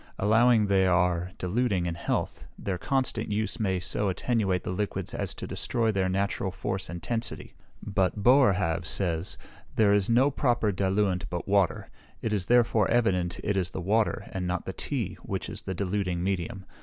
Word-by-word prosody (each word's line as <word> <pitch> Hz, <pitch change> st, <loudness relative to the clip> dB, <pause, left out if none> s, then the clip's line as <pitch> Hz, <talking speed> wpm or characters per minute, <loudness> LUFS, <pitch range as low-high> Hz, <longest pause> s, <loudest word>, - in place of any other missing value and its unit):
Allowing 115 Hz, +2 st, +4 dB
they 95 Hz, -2 st, +3 dB
are 90 Hz, 0 st, +2 dB
diluting 95 Hz, -1 st, 0 dB
in 85 Hz, -, -1 dB
health, 85 Hz, -, -3 dB
their 95 Hz, -3 st, -3 dB
constant 130 Hz, -4 st, -1 dB
use 110 Hz, +1 st, -1 dB
may 95 Hz, -4 st, 0 dB
so 100 Hz, +3 st, -1 dB
attenuate 95 Hz, -2 st, 0 dB
the -, -, -3 dB
liquids 100 Hz, +2 st, -3 dB
as -, -, -2 dB
to -, -, -6 dB
destroy 115 Hz, -2 st, 0 dB
their 95 Hz, -2 st, 0 dB
natural 100 Hz, 0 st, -1 dB
force 95 Hz, +1 st, -4 dB
and 85 Hz, -1 st, -7 dB
tensity. 115 Hz, -1 st, -2 dB, 0.3 s
But 100 Hz, 0 st, 0 dB
Boerhaave 95 Hz, -, +4 dB
says, 85 Hz, -3 st, 0 dB, 0.4 s
there 105 Hz, -2 st, +4 dB
is 100 Hz, 0 st, +2 dB
no 130 Hz, +5 st, +4 dB
proper 120 Hz, -6 st, +1 dB
diluent 95 Hz, -2 st, 0 dB
but 85 Hz, -1 st, -4 dB
water; 100 Hz, -2 st, +1 dB, 0.3 s
it 110 Hz, -, -2 dB
is 95 Hz, -3 st, -1 dB
therefore 115 Hz, -4 st, +3 dB
evident 95 Hz, -7 st, +1 dB
it 100 Hz, -, 0 dB
is 90 Hz, -2 st, 0 dB
the -, -, -6 dB
water, 105 Hz, +4 st, 0 dB
and 90 Hz, -2 st, -3 dB
not 90 Hz, 0 st, -2 dB
the -, -, -4 dB
tea, -, -, -3 dB
which -, -, -4 dB
is -, -, -4 dB
the 95 Hz, -, -5 dB
diluting 90 Hz, -2 st, -1 dB
medium. 95 Hz, +1 st, -2 dB
100 Hz, 175 wpm, -27 LUFS, 90-110 Hz, 0.4 s, Allowing